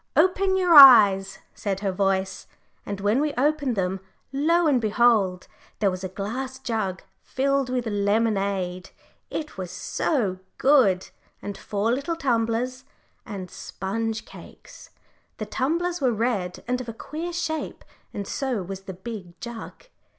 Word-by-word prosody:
"Open 380 +1 +3
your 360 -2 +3
eyes," 205 -9 +9 0.2
said 195 -2 -3
her 200 -2 0
voice, 190 0 -1 0.4
and 200 -1 -4
when 205 +7 +2
we 300 -1 -1
opened 285 -1 +1
them, 190 -1 -1 0.3
lo 330 +5 +2
and 275 -6 +3
behold! 215 -4 +2 0.3
there 200 -2 +2
was 185 +1 -6
a 185 - -3
glass 250 +8 -5
jug 215 -7 -3 0.2
filled 275 0 0
with 250 -1 -1
lemonade 200 -3 0 0.4
it 300 -10 -5
was 185 -2 -4
so 190 - -1 0.2
good 245 -10 +3 0.3
and 200 0 -6
four 205 +3 -2
little 280 +7 -1
tumblers, 250 -2 -1 0.4
and 195 -5 -7
sponge 220 +3 -4
cakes. - - -14 0.5
The 215 - -4
tumblers 335 +10 -1
were 255 -2 +3
red 215 -6 -2
and 250 +1 -1
of 240 - -7
a - - -5
queer 315 +9 -6
shape, 320 -2 -4 0.3
and 200 - -5
so 255 -8 -2
was 190 +1 -6
the - - -4
big 190 -2 -9
jug. 235 - -9
225 Hz, 145 wpm, -25 LUFS, 195-270 Hz, 0.5 s, eyes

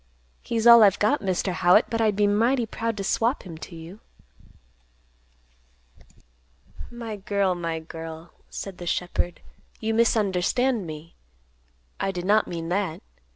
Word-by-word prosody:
He's 230 -1 -2
all 235 -1 +9
I've 205 -2 +5
got, 275 +8 +1
Mr. 185 -1 -1
Howitt. 180 +5 +4
But 230 -1 0
I'd 215 -2 +2
be 205 0 +2
mighty 230 +5 +2
proud 225 0 -4
to 200 - -3
swap 230 +7 0
him 175 -4 -9
to 170 - -9
you." 165 +5 -11 2.9
"My 230 -3 -7
girl, 200 -1 0
my 170 -2 -3
girl," 160 0 -9 0.2
said 195 -2 -7
the 175 - -7
shepherd, 175 0 -2 0.4
"you 225 0 -1
misunderstand 220 0 +1
me. 155 +1 -9 0.9
I - - -1
did 180 -2 -4
not 210 +2 +3
mean 165 -1 -5
that. 185 -3 -2
200 Hz, 140 wpm, -25 LUFS, 175-225 Hz, 2.9 s, all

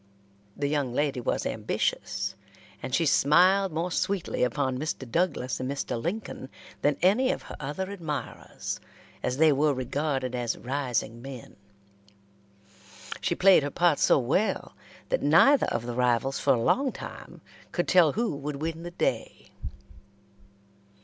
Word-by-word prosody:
The 145 - -1
young 140 -4 -1
lady 140 -3 0
was - - -1
ambitious, - - -2 0.5
and 130 - -5
she 165 - +2
smiled 180 +7 +4
more 165 +3 -2
sweetly 195 +1 -1
upon 130 +1 0
Mr. 145 -3 -4
Douglas 145 -2 -1
and 130 0 -3
Mr. 135 -4 -3
Lincoln 175 - -4 0.3
than 145 -1 +2
any 235 +8 +4
of - - -4
her - - -9
other 150 +7 -4
admirers, 160 -8 -5 0.4
as 125 - -2
they 155 +1 +5
were 145 +1 +2
regarded 130 0 -2
as 120 -2 -2
rising 125 -3 -2
men. 130 -2 -9 1.7
She - - 0
played 190 -3 +6
her 145 - -2
part 170 0 +2
so - - +5
well 145 - 0 0.3
that - - +1
neither 280 0 +5
of 120 - -2
the 120 - -4
rivals 125 +2 +1
for - - +3
a - - -1
long 270 - +2
time - - -10 0.3
could 175 - -1
tell 175 -5 +5
who 230 -7 -1
would 145 +1 -5
win 160 +3 -4
the 175 - -6
day. 175 - -3
145 Hz, 145 wpm, -27 LUFS, 130-175 Hz, 1.7 s, played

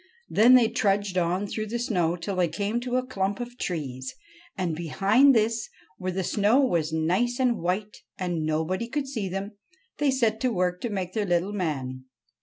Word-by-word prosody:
Then 240 +4 +7
they 240 -3 +6
trudged 200 -3 0
on 180 +2 +1
through 215 +2 -4
the 235 +3 -2
snow 180 -8 0
till 180 +3 -4
they 180 -1 +3
came 205 +7 -2
to 245 0 -3
a 255 0 +1
clump 200 -5 -2
of 245 0 -6
trees, 130 -7 -4 0.4
and, 175 -4 -1
behind 200 - +4
this, 225 0 +1 0.3
where 185 0 -2
the 190 +1 -2
snow 210 +7 +3
was 170 - +1
nice 185 +11 0
and 250 -2 +2
white, 190 +5 -2 0.2
and 175 -4 -2
nobody 160 +8 -1
could 280 +2 -2
see 220 -8 -3
them, 195 +3 -5 0.4
they 290 -1 +3
set 230 -5 +1
to 255 0 +1
work 180 -3 0
to 240 - -2
make 185 -3 -3
their 210 -2 -1
little 175 +3 +1
man. 135 -9 -3
195 Hz, 190 wpm, -26 LUFS, 175-230 Hz, 0.4 s, Then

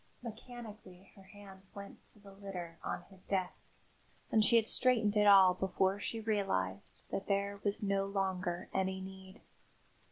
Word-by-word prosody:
Mechanically 220 -5 -10
her 195 - -15
hands 195 -1 -13
went 200 0 -10
to - - -17
the 200 -1 -14
litter 185 -4 -7
on 175 - -3
his 190 -1 -15
desk 185 -2 -3 0.6
and 220 - +5
she 235 - +5
had 225 -1 +4
straightened 230 -5 +3
it 210 0 +4
all 190 -2 +8
before 190 +1 0
she 225 +2 -3
realised 145 - -2
that 195 - -3
there 200 0 -1
was 205 +1 0
no 195 -1 +1
longer 185 -3 -2
any 190 0 0
need. 190 0 -10
195 Hz, 155 wpm, -34 LUFS, 190-205 Hz, 0.6 s, all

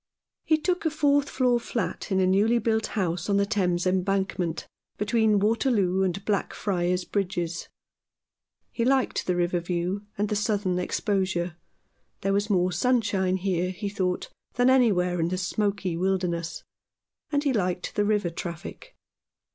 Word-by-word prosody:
He 315 - +3
took 360 +3 -1
a 320 - +2
fourth 285 -2 +2
floor 250 -2 +2
flat 215 -5 -4
in 190 - +2
a 185 - +3
newly 205 +6 +3
built 220 -1 +1
house 175 -1 -1
on 200 - +3
the 200 - +3
Thames 185 -4 0
Embankment, 185 -2 0 0.3
between 215 0 +2
Waterloo 205 -3 +2
and 190 +1 -1
Blackfriars 180 -3 -1
Bridges. 175 -4 -2 1.0
He 230 - -1
liked 265 +1 +1
the 180 - +1
river 175 0 +1
view 180 +4 -3
and 205 +1 +1
the 210 - -1
southern 205 -3 0
exposure. 185 -3 -1 0.7
There 195 0 +1
was 205 +2 0
more 185 -2 +2
sunshine 195 -2 +1
here, 180 -1 0
he 200 +2 -4
thought, 185 -2 -2 0.3
than 245 +1 +4
anywhere 185 -9 +3
in 165 - +1
the 185 +1 -2
smoky 195 -1 -1
wilderness; 175 -2 -1 0.7
and 290 -1 +1
he 280 -3 +1
liked 180 -4 -1
the 205 - +1
river 205 -4 +1
traffic. 170 - -7
195 Hz, 145 wpm, -26 LUFS, 180-215 Hz, 1.0 s, than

